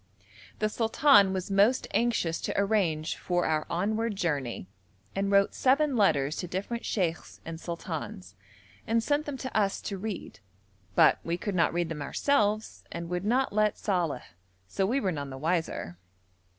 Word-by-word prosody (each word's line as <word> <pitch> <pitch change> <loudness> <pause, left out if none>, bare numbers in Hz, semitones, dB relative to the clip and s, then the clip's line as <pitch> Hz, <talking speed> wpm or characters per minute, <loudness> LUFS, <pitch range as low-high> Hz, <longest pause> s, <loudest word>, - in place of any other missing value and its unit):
The 215 - +1
sultan 225 -1 +4
was 190 0 -3
most 205 +6 +3
anxious 225 -8 +1
to - - -1
arrange 190 -7 +1
for 175 -1 0
our 155 -1 0
onward 215 +5 -1
journey, 145 - -2 0.5
and 195 0 0
wrote 200 0 +4
seven 275 +2 +2
letters 155 - +2
to 180 - -3
different 200 +7 -4
sheikhs 175 -5 -2
and 165 0 -6
sultans, 160 - -6 0.5
and 230 0 +2
sent 295 +3 0
them 285 -2 -4
to 260 -1 -6
us 200 -2 +2
to 195 -2 -5
read, 210 -2 -6 0.6
but - - +6
we 170 +1 -2
could 205 +3 -3
not 170 -2 +3
read 175 -1 -1
them 155 -3 -5
ourselves, 215 - 0
and 170 0 -5
would 180 +2 -2
not 250 +2 +1
let 215 0 +2
Saleh, 175 - -1 0.4
so 190 - 0
we 255 +6 +1
were 195 -7 0
none 145 -4 -4
the 130 - -7
wiser. 155 - -2
195 Hz, 165 wpm, -28 LUFS, 165-220 Hz, 0.6 s, but